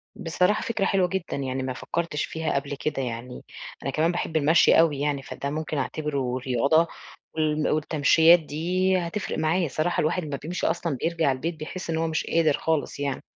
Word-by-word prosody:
بصراحة 180 +6 +1
فكرة 220 -4 -1
حلوة 190 -2 +2
جدًا، 185 -3 -3
يعني 130 -1 -3
ما 130 0 -3
فكّرتش 165 +3 -2
فيها 160 -1 -3
قبل 140 +1 -2
كده 140 0 -2
يعني، 125 0 -5 0.4
أنا 135 - -2
كمان 160 +5 +1
باحب 165 -2 -2
المشي 155 +3 +5
أوي 160 -4 +3
يعني، 145 -1 -1
فده 140 - -5
ممكن 155 +1 -3
أعتبره 140 -3 -2
رياضة 135 +6 +2 0.5
وال 155 -1 +1
والتَمشيّات 160 +2 +5
دي 180 +5 0
هتفرق 180 +3 -3
معايا، 160 +2 +1
صراحة 155 +5 0
الواحد 170 +4 0
أمّا 145 -2 -4
بيمشي 170 +4 -2
أصلًا 170 -3 -1
بيرجع 165 -4 +1
البيت، 160 +6 -3
بيحِس 160 +4 -7
إن 160 - 0
هو 165 0 0
مش 160 -1 -1
قادر 160 -3 +2
خالص 160 -3 -1
يعني. 140 -2 -2
155 Hz, 180 wpm, -25 LUFS, 140-170 Hz, 0.5 s, المشي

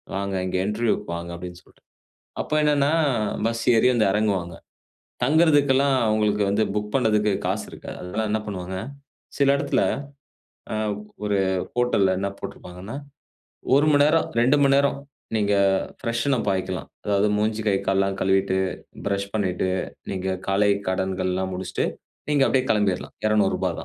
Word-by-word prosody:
“வாங்க 100 0 -2
இங்க 90 - -1
இன்டர்வியூக்கு 110 +2 0
வாங்க” 85 0 -7
அப்டின்னு 90 0 -9
சொல்ட்டு. - - -25 0.6
அப்ப - - -5
என்னன்னா, 145 -1 +3 0.5
பஸ் 115 0 -1
ஏறி 115 +3 +4
வந்து 110 - +3
இறங்குவாங்க. 95 -5 0 0.7
தங்குறதுக்கெல்லாம் 140 -2 +4
அவுங்களுக்கு 105 -1 +2
வந்து 105 +2 +2
புக் 105 0 -2
பண்ணதுக்கு 105 -5 +2
காசு - - -1
இருக்காது. - - -9
அது 90 - -7
தான் 110 0 0
என்ன 110 +1 +1
பண்ணுவாங்க, 95 -2 -5 0.6
சில 140 -1 +3
இடத்துல 140 - 0 0.9
அ - - -1 0.5
ஒரு 105 -1 +1 0.4
ஹோட்டல்ல 120 -6 +2
என்ன 100 - -1
போட்ருப்பாங்கன்னா, 90 +7 -8 0.8
1 145 +2 +4
மணி 145 -1 +5
நேரம், 160 +2 +3
2 130 +5 +4
மணி 140 0 +4
நேரம் 140 0 +2 0.4
நீங்க 105 -1 +1 0.5
பிரஷ்ன் 115 +3 0
அப் - - -3
பாய்க்கலாம். 95 -1 -2 0.2
அதாவது, 100 0 +2
மூஞ்சி, 110 +1 0
கை, 100 - +3
கால்லாம் 95 0 +1
கழுவிட்டு, 95 0 +2 0.5
பிரஷ் 100 0 -2
பண்ணிட்டு, 95 -3 0 0.4
நீங்க 95 -1 -2
காலை 100 +1 +3 0.2
கடன்கள்லாம் 95 0 -1
முடிச்ட்டு, 90 0 -2 0.4
நீங்க 145 -2 +3
அப்டியே 130 0 +2
கிளம்பிர்லாம். 105 -4 0
ரூ.200. 110 -1 +1
105 Hz, 140 wpm, -24 LUFS, 95-125 Hz, 0.9 s, மணி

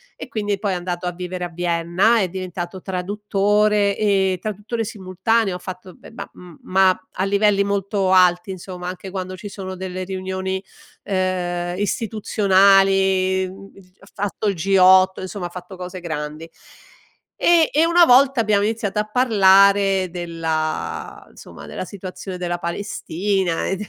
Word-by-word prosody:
e - - -8
quindi 205 -3 -2
poi 205 -2 -1
è - - -1
andato 175 0 -4
a - - -1
vivere 180 0 -6
a 175 - -3
Vienna 175 +6 +1
è 190 -3 0
diventato 185 0 -6
traduttore, 205 +2 +1
ehm, 195 -3 +1
traduttore 215 +3 -4
simultaneo 200 0 -1
ha - - -7
fatto 185 0 -9
beh - - -15
ma 230 - -8
m 175 -3 -14
ma 185 0 +2
a 185 - -2
livelli 200 0 +2
molto 200 -1 -1
alti 180 0 +4
insomma, 180 -1 -7
anche 185 +1 -7
quando 185 -1 -5
ci 205 +3 -8
sono 190 -1 -7
delle 185 0 -5
riunioni, 190 0 -4 0.4
ehm, 180 -2 -2
istituzionali, 195 -2 +2
mhmm, 195 +1 -13
il 185 -2 -18
g 185 - -39
ha - - -18
fatto 205 +1 -3
il 200 - +1
G8, 190 +1 +4
insomma 185 -1 -5
ha - - -13
fatto 180 +2 -10
cose 180 0 -7
grandi. 155 -1 -6 0.9
E 335 -2 +4
e 310 +3 +4
una 340 0 +6
volta 265 0 +5
abbiamo 210 -2 +2
iniziato 210 -1 -1
a 210 0 -2
parlare 195 -4 +4
della 160 - -4
insomma - - -13
della - - -6
situazione 185 -1 -8
della 175 -1 -3
Palestina 185 0 -2
e 190 - -1
d 210 - -5
190 Hz, 155 wpm, -21 LUFS, 180-205 Hz, 0.9 s, una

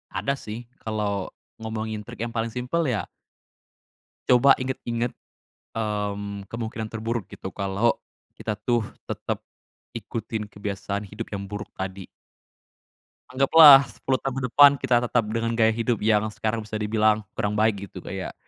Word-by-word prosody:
Ada 140 - -1
sih 115 -2 -8 0.2
kalau, 105 -3 -2 0.3
ngomongin 110 -1 -4
trik 120 -1 -11
yang 115 - -6
paling 115 0 -1
simpel 125 +8 -1
ya 110 -5 -1 1.2
coba 130 +2 +7
inget-inget, 120 -2 -2 0.6
mmm, 105 -2 -3
kemungkinan 110 -1 -4
terburuk 115 -1 -3
gitu 95 - -7
kalau, 100 +3 +1 0.4
kita 105 - -4
tuh 120 +3 +1 0.3
tetep, - - -3 0.5
ikutin 110 -1 -5
kebiasaan 100 0 -4
hidup 105 +3 -7
yang 100 -1 -5
buruk 105 +1 -6
tadi. 95 0 -5 1.2
Anggaplah 140 +1 +8
10 120 +3 -2
tahun 135 -2 -3
ke - - -5
depan 145 +3 +8
kita 130 -2 +2
tetap 120 -1 +2
dengan 115 +1 -1
gaya 115 -1 +4
hidup 115 0 -1
yang 105 0 +3
sekarang 110 0 -2
bisa 110 - -6
dibilang 110 0 +2 0.2
kurang 105 0 0
baik 105 -2 +1
gitu - - -10
kayak, - - -5
110 Hz, 140 wpm, -25 LUFS, 105-120 Hz, 1.2 s, Anggaplah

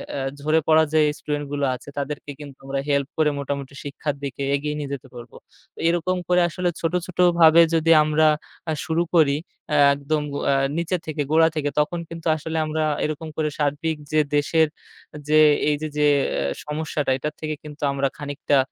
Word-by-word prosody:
এ - - -3 0.2
ঝরে 155 +3 +2
পড়া 160 0 +6
যে 155 - +4 0.2
স্টুডেন্টগুলো 145 -1 -2
আছে 125 - -12
তাদেরকে 145 +1 -4
কিন্তু 140 -2 -10
আমরা 135 0 -2
হেল্প 140 -1 +1
করে 155 -1 +3
মোটামুটি 140 -1 -4
শিক্ষার 145 +1 -4
দিকে 140 0 -5
এগিয়ে 150 +1 -3
নিয়ে 145 -2 -5
যেতে 135 -1 -7
পারব। 120 -1 -10 0.6
এরকম 175 +2 +1
করে 180 0 +3
আসলে 180 +2 -1
ছোট 165 +1 -1
ছোটভাবে 170 -2 +5
যদি 165 0 +3
আমরা 155 +1 +2 0.6
শুরু 165 0 0
করি 155 -4 +5 0.4
এ - - +3 0.2
একদম 145 +2 -1
গ - - -4
অ্যা 140 - +3 0.2
নিচে 170 +2 0
থেকে 155 -1 -3
গোড়া 160 +1 +5
থেকে 145 -2 -1
তখন 170 +3 0
কিন্তু 165 0 -7
আসলে 160 +1 -4
আমরা 155 0 -1 0.2
এরকম 155 +1 -4
করে 155 -1 0
সার্বিক 145 +2 0 0.2
যে 155 - +3 0.2
দেশের 160 +2 +3 0.6
যে 155 - +4 0.3
এই 150 - +2
যে 155 - -2
যে, 150 - +2 0.6
সমস্যাটা 150 -2 -2
এটার 150 +3 -4
থেকে 155 -1 -3
কিন্তু 150 0 -11
আমরা 140 0 0
খানিকটা 145 0 -1
150 Hz, 175 wpm, -23 LUFS, 145-160 Hz, 0.6 s, পড়া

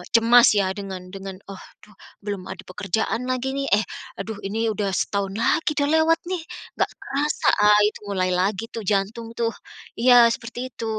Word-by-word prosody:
cemas 235 +2 +7
ya 195 -2 +2
dengan 190 -2 -7
dengan, 195 -1 -7 0.2
"Oh, 195 - -9 0.2
duh, 210 0 -18 0.3
belum 200 -3 -4
ada - - -7
pekerjaan 220 +6 -2
lagi 255 +1 -1
nih, 275 0 -2
eh, 210 +1 +4 0.4
aduh 215 +1 -5
ini 225 +3 -1
udah 205 -1 -1
setahun 200 0 -1
lagi 305 +7 +1
dah 285 -1 +1
lewat 320 +1 +3
nih, 365 -2 -2 0.4
nggak - - +1
kerasa." 290 +2 -1
Ah, 210 0 +6
itu - - -5
mulai 185 -2 0
lagi 190 +3 0
tuh 225 - -5
jantung 210 +3 -1
tuh, 230 -1 0 0.5
iya 240 -1 +7
seperti 230 +1 -8
itu. 230 - -6
220 Hz, 175 wpm, -23 LUFS, 195-245 Hz, 0.5 s, cemas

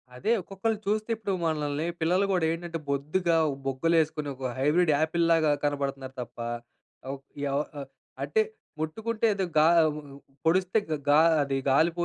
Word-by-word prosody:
అదే 210 - -1
ఒక్కొక్కళ్ళు 200 +4 -2
చూస్తే, 215 +2 0
ఇప్పుడు 205 -3 -3
మనల్ని, 150 -1 -1 0.2
పిల్లలు 180 +5 +3
గూడా 175 -4 +2
ఏంటంటే 165 0 -4
బొద్దుగా 160 +5 +1 0.3
బుగ్గలేసుకొని 155 +2 +1
ఒక 130 -1 -4
హైబ్రిడ్ 155 +4 +3
ఆపిల్‌లాగా 165 -1 +3
కనపడుతున్నారు 140 -2 -2
తప్ప, 120 0 -9 0.8
ఉ - - -4 0.3
ఎవ 140 - 0 0.7
అంటే 440 - +2 0.4
ముట్టుకుంటే, 220 +9 -2
ఏదో 190 -1 0
గా 155 +1 +6 0.8
పొడిస్తే 185 +5 +3 0.3
గా 150 +2 +7 0.2
అది 135 -1 -2 0.2
గాలి 160 +5 +4
160 Hz, 125 wpm, -27 LUFS, 145-185 Hz, 0.8 s, గా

